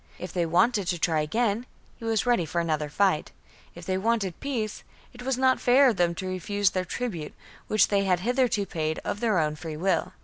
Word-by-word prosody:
If 180 Hz, -1 st, -7 dB
they 175 Hz, -2 st, 0 dB
wanted 200 Hz, +4 st, +2 dB
to 175 Hz, -1 st, 0 dB
try 160 Hz, -2 st, +1 dB
again, 225 Hz, +8 st, 0 dB, 0.3 s
he 230 Hz, -, -9 dB
was 225 Hz, 0 st, +1 dB
ready 240 Hz, -7 st, +3 dB
for 170 Hz, +2 st, -2 dB
another 155 Hz, -3 st, -1 dB
fight; 185 Hz, -1 st, +1 dB, 0.4 s
if 175 Hz, 0 st, -10 dB
they 185 Hz, +1 st, -1 dB
wanted 205 Hz, -4 st, 0 dB
peace, 230 Hz, -7 st, -3 dB, 0.3 s
it 245 Hz, -, -11 dB
was 260 Hz, 0 st, -1 dB
not 260 Hz, 0 st, +3 dB
fair 260 Hz, +2 st, +6 dB
of 220 Hz, -, -1 dB
them 170 Hz, -1 st, +2 dB
to 185 Hz, -, -5 dB
refuse 190 Hz, +2 st, 0 dB
their 185 Hz, -1 st, -2 dB
tribute, 175 Hz, -8 st, -4 dB, 0.3 s
which 215 Hz, -, +3 dB
they 200 Hz, -1 st, +2 dB
had 180 Hz, -2 st, +2 dB
hitherto 245 Hz, -2 st, +1 dB
paid 160 Hz, -3 st, -2 dB
of 205 Hz, -, -2 dB
their 220 Hz, -4 st, +1 dB
own 155 Hz, -2 st, +1 dB
free 155 Hz, -1 st, -7 dB
will. 180 Hz, 0 st, 0 dB
190 Hz, 210 wpm, -26 LUFS, 170-230 Hz, 0.4 s, fair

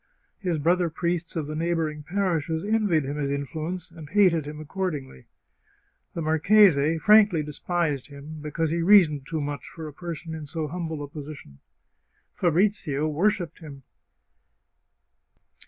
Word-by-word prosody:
His 180 Hz, -5 st, -1 dB
brother 170 Hz, +3 st, +2 dB
priests 170 Hz, +1 st, -2 dB
of 160 Hz, -3 st, -2 dB
the 155 Hz, +1 st, -5 dB
neighbouring 160 Hz, -2 st, -1 dB
parishes 165 Hz, -2 st, -1 dB
envied 205 Hz, -7 st, +2 dB
him 140 Hz, +2 st, -4 dB
his 140 Hz, -2 st, -1 dB
influence, 155 Hz, +5 st, -4 dB
and 160 Hz, -3 st, -11 dB
hated 175 Hz, -6 st, +3 dB
him 150 Hz, 0 st, -7 dB
accordingly. 155 Hz, -, -5 dB, 0.9 s
The 165 Hz, -, -2 dB
marchese 160 Hz, -1 st, +4 dB
frankly 205 Hz, -2 st, +5 dB
despised 150 Hz, -1 st, -2 dB
him, 145 Hz, +2 st, -10 dB
because 155 Hz, +1 st, -2 dB
he 170 Hz, +1 st, 0 dB
reasoned 165 Hz, -7 st, +5 dB
too 160 Hz, -2 st, -2 dB
much 145 Hz, -2 st, -4 dB
for 160 Hz, -2 st, -8 dB
a 150 Hz, -, -9 dB
person 165 Hz, 0 st, -6 dB
in 155 Hz, -2 st, -7 dB
so 155 Hz, +1 st, -3 dB
humble 160 Hz, -2 st, -4 dB
a -, -, -6 dB
position. 140 Hz, -, -10 dB, 0.7 s
Fabrizio 170 Hz, -4 st, +1 dB
worshipped 170 Hz, +1 st, 0 dB
him. 140 Hz, -4 st, -11 dB
160 Hz, 140 wpm, -26 LUFS, 150-175 Hz, 0.9 s, frankly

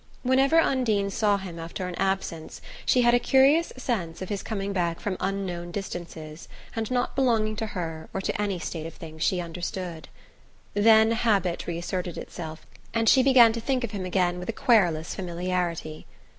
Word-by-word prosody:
Whenever 270 Hz, +4 st, +3 dB
Undine 220 Hz, -10 st, +1 dB
saw 205 Hz, 0 st, +2 dB
him 180 Hz, -4 st, -7 dB
after 170 Hz, +3 st, -5 dB
an 180 Hz, -, -5 dB
absence 190 Hz, -4 st, -2 dB, 0.3 s
she 250 Hz, -, +4 dB
had 240 Hz, 0 st, +5 dB
a 245 Hz, -, +5 dB
curious 275 Hz, +6 st, +4 dB
sense 190 Hz, -11 st, -3 dB
of 185 Hz, -, -6 dB
his 205 Hz, -2 st, -2 dB
coming 200 Hz, -2 st, -3 dB
back 170 Hz, -3 st, -1 dB
from 200 Hz, -2 st, -2 dB
unknown 185 Hz, -3 st, -3 dB
distances 170 Hz, -4 st, -7 dB, 0.3 s
and 225 Hz, -1 st, -2 dB
not 250 Hz, -1 st, -1 dB
belonging 225 Hz, -5 st, +2 dB
to 220 Hz, 0 st, -3 dB
her 165 Hz, -5 st, -5 dB
or -, -, -3 dB
to 195 Hz, -, -2 dB
any 200 Hz, -3 st, -1 dB
state 165 Hz, -2 st, -5 dB
of 165 Hz, -, -11 dB
things 160 Hz, -1 st, -10 dB
she 180 Hz, +2 st, +2 dB
understood. 175 Hz, 0 st, -5 dB, 0.6 s
Then 220 Hz, +1 st, +5 dB
habit 205 Hz, -7 st, +1 dB
reasserted 175 Hz, +1 st, -3 dB
itself, 160 Hz, -2 st, -7 dB, 0.3 s
and 225 Hz, 0 st, +1 dB
she 260 Hz, -, +7 dB
began 250 Hz, -4 st, +7 dB
to 230 Hz, -, -4 dB
think 260 Hz, +1 st, 0 dB
of 235 Hz, -, -3 dB
him 200 Hz, -3 st, -4 dB
again 180 Hz, -1 st, +1 dB
with 180 Hz, -, -7 dB
a -, -, 0 dB
querulous 175 Hz, -10 st, +2 dB
familiarity. 175 Hz, -3 st, -3 dB
195 Hz, 175 wpm, -26 LUFS, 170-225 Hz, 0.6 s, she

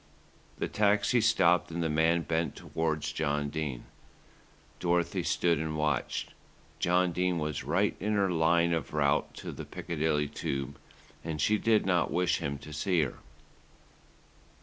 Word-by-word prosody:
The -, -, -2 dB
taxi 105 Hz, +3 st, +2 dB
stopped 90 Hz, -5 st, +3 dB
and 85 Hz, 0 st, -3 dB
the -, -, +1 dB
man 80 Hz, +2 st, +2 dB
bent 80 Hz, -2 st, -1 dB
towards 80 Hz, -2 st, -2 dB
John 75 Hz, -2 st, -1 dB
Dene. 75 Hz, -5 st, -4 dB, 1.0 s
Dorothy 85 Hz, -1 st, +1 dB
stood 85 Hz, -3 st, +1 dB
and 80 Hz, 0 st, -3 dB
watched. 75 Hz, -4 st, -1 dB, 0.5 s
John 90 Hz, 0 st, +2 dB
Dene 90 Hz, +1 st, 0 dB
was 75 Hz, -3 st, -3 dB
right -, -, +1 dB
in 105 Hz, +2 st, -1 dB
her 100 Hz, -2 st, +2 dB
line 85 Hz, 0 st, +3 dB
of 80 Hz, -3 st, -3 dB
route 70 Hz, -2 st, +1 dB
to -, -, -6 dB
the -, -, -7 dB
Piccadilly 75 Hz, -2 st, -1 dB
Tube, 70 Hz, -1 st, -4 dB, 0.4 s
and 80 Hz, -2 st, -4 dB
she 105 Hz, +7 st, +2 dB
did 110 Hz, -2 st, +3 dB
not 90 Hz, -2 st, +2 dB
wish 90 Hz, 0 st, +1 dB
him 70 Hz, 0 st, -3 dB
to 75 Hz, +2 st, -11 dB
see 85 Hz, +1 st, +1 dB
her. 65 Hz, -, -5 dB
80 Hz, 150 wpm, -30 LUFS, 75-90 Hz, 1.0 s, stopped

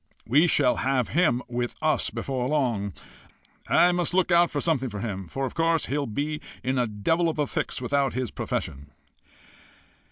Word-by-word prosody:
We 145 Hz, +9 st, +4 dB
shall 140 Hz, -6 st, +3 dB
have 130 Hz, -3 st, 0 dB
him 150 Hz, -7 st, +2 dB
with 120 Hz, 0 st, -3 dB
us 155 Hz, 0 st, +1 dB
before 130 Hz, -2 st, -3 dB
long. 120 Hz, -9 st, 0 dB, 0.8 s
I 180 Hz, -, +5 dB
must 175 Hz, 0 st, -1 dB
look 185 Hz, -1 st, +2 dB
out 170 Hz, 0 st, +5 dB
for 145 Hz, -, -2 dB
something 140 Hz, -5 st, 0 dB
for 105 Hz, -2 st, -6 dB
him, 100 Hz, -4 st, -4 dB
for 135 Hz, +9 st, -3 dB
of 130 Hz, -, -5 dB
course 165 Hz, -1 st, +1 dB
he'll 145 Hz, 0 st, -2 dB
be 145 Hz, +7 st, -3 dB, 0.2 s
in 130 Hz, +1 st, 0 dB
a 120 Hz, -, +1 dB
devil 160 Hz, +12 st, +1 dB
of 160 Hz, -, -4 dB
a 150 Hz, -, +1 dB
fix -, -, -3 dB
without 135 Hz, +1 st, 0 dB
his 130 Hz, -4 st, -2 dB
profession." 70 Hz, +1 st, -4 dB
135 Hz, 180 wpm, -26 LUFS, 120-155 Hz, 0.8 s, I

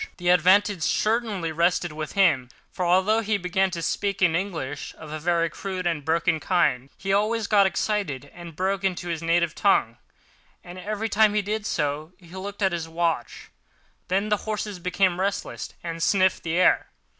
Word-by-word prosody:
The 175 Hz, -1 st, -1 dB
advantage 185 Hz, +2 st, +4 dB
certainly 210 Hz, -3 st, 0 dB
rested 170 Hz, +1 st, +1 dB
with 155 Hz, 0 st, -6 dB
him, 160 Hz, -11 st, +3 dB, 0.2 s
for 185 Hz, -, -3 dB
although 190 Hz, +5 st, +3 dB
he 215 Hz, -1 st, 0 dB
began 190 Hz, +1 st, 0 dB
to 170 Hz, -2 st, -5 dB
speak 200 Hz, +3 st, -1 dB
in 165 Hz, -2 st, +4 dB
English, 160 Hz, -6 st, -4 dB
of 155 Hz, -2 st, -10 dB
a 155 Hz, -, -4 dB
very 170 Hz, +1 st, +1 dB
crude 185 Hz, +2 st, -5 dB
and 165 Hz, -4 st, -1 dB
broken 165 Hz, +1 st, +1 dB
kind, 140 Hz, -7 st, +1 dB
he 195 Hz, 0 st, -2 dB
always 215 Hz, +2 st, +1 dB
got 200 Hz, -2 st, +4 dB
excited 175 Hz, -, -2 dB
and 170 Hz, -2 st, -10 dB
broke 190 Hz, +2 st, -1 dB
into 180 Hz, -2 st, -2 dB
his 165 Hz, -2 st, -3 dB
native 170 Hz, 0 st, +1 dB
tongue—and 175 Hz, -, -3 dB
every 210 Hz, +3 st, -3 dB
time 215 Hz, 0 st, +3 dB
he 210 Hz, -, +2 dB
did 210 Hz, +1 st, -3 dB
so, 150 Hz, +3 st, -2 dB
he 175 Hz, -, -18 dB
looked 200 Hz, +2 st, -5 dB
at 190 Hz, -, +3 dB
his 165 Hz, -2 st, -4 dB
watch. 165 Hz, -6 st, -2 dB, 0.6 s
Then 195 Hz, +3 st, 0 dB
the 210 Hz, -, +2 dB
horses 210 Hz, -2 st, -4 dB
became 180 Hz, 0 st, +1 dB
restless 200 Hz, +1 st, -3 dB
and 165 Hz, -1 st, -5 dB
sniffed 185 Hz, 0 st, +2 dB
the 165 Hz, 0 st, -2 dB
air. 185 Hz, -, +4 dB
180 Hz, 175 wpm, -25 LUFS, 165-200 Hz, 0.6 s, advantage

